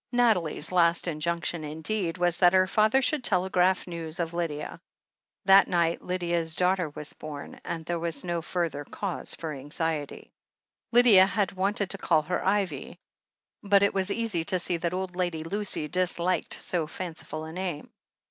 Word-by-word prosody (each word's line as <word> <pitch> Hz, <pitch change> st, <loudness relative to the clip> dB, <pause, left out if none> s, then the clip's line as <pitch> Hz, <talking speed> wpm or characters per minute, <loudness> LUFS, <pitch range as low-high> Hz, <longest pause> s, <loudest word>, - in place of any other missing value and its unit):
Nathalie's 200 Hz, -, +2 dB
last 170 Hz, -1 st, +3 dB
injunction, 170 Hz, +1 st, -2 dB
indeed, 165 Hz, +4 st, -2 dB
was 175 Hz, -1 st, +1 dB
that 175 Hz, -1 st, +5 dB
her 185 Hz, 0 st, +5 dB
father 215 Hz, +7 st, +3 dB
should 295 Hz, 0 st, +1 dB
telegraph 185 Hz, -2 st, +2 dB
news 170 Hz, -1 st, -6 dB
of 170 Hz, -1 st, -2 dB
Lydia. 165 Hz, -4 st, -4 dB, 0.6 s
That 195 Hz, +1 st, +7 dB
night 170 Hz, -2 st, +1 dB
Lydia's 170 Hz, -3 st, -2 dB
daughter 180 Hz, -2 st, +1 dB
was 150 Hz, 0 st, -6 dB
bom, 150 Hz, -2 st, -8 dB
and 165 Hz, -2 st, -5 dB
there 170 Hz, 0 st, -2 dB
was 165 Hz, -4 st, -4 dB
no 175 Hz, -2 st, -2 dB
further 165 Hz, -4 st, -2 dB
cause 190 Hz, +5 st, -3 dB
for 160 Hz, -2 st, -5 dB
anxiety. 145 Hz, +2 st, -4 dB, 0.6 s
Lydia 230 Hz, -6 st, +7 dB
had 205 Hz, -2 st, 0 dB
wanted 195 Hz, 0 st, 0 dB
to 195 Hz, -, -1 dB
call 155 Hz, -, +2 dB
her 180 Hz, +4 st, -2 dB
Ivy, 185 Hz, -6 st, -1 dB, 0.6 s
but 200 Hz, -1 st, +4 dB
it 200 Hz, -, +3 dB
was 190 Hz, 0 st, 0 dB
easy 205 Hz, -6 st, -1 dB
to 190 Hz, 0 st, +1 dB
see 175 Hz, 0 st, -1 dB
that 170 Hz, +1 st, -2 dB
old 185 Hz, -1 st, -4 dB
Lady 175 Hz, -3 st, -2 dB
Lucy 195 Hz, -3 st, -2 dB
disliked 180 Hz, +1 st, 0 dB
so 170 Hz, -4 st, -2 dB
fanciful 160 Hz, -2 st, -6 dB
a 160 Hz, -, -7 dB
name. 180 Hz, -4 st, -5 dB
175 Hz, 160 wpm, -27 LUFS, 165-190 Hz, 0.6 s, That